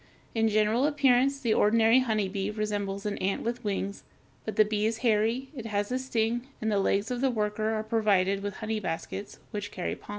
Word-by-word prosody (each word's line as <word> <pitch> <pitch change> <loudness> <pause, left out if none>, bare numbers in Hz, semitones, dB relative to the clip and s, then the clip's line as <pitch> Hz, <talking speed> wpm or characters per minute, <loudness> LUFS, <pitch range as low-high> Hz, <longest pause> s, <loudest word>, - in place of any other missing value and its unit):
In 225 -1 +2
general 215 +5 +3
appearance 275 -2 +3
the 235 -5 +1
ordinary 225 +4 +5
honeybee 205 -5 -1
resembles 205 -2 -3
an 205 -1 -2
ant 195 +1 -1
with 240 +2 -3
wings; 200 -1 -2 0.4
but 220 - -4
the 215 - +5
bee 210 0 0
is 225 0 -1
hairy, 230 +4 +2
it 235 -4 -6
has 205 +1 -1
a 255 - 0
sting, 240 -1 -1
and 220 0 -1
the 205 - +2
legs 200 +3 +1
of 245 0 -2
the 270 - +3
worker 215 -2 -1
are 215 - -2
provided 200 -3 +2
with 200 -1 -4
"honey 220 0 -3
baskets," 175 +2 -5
which 205 -1 -4
carry 180 - -3
pollen. - - -19
215 Hz, 200 wpm, -28 LUFS, 205-235 Hz, 0.4 s, ordinary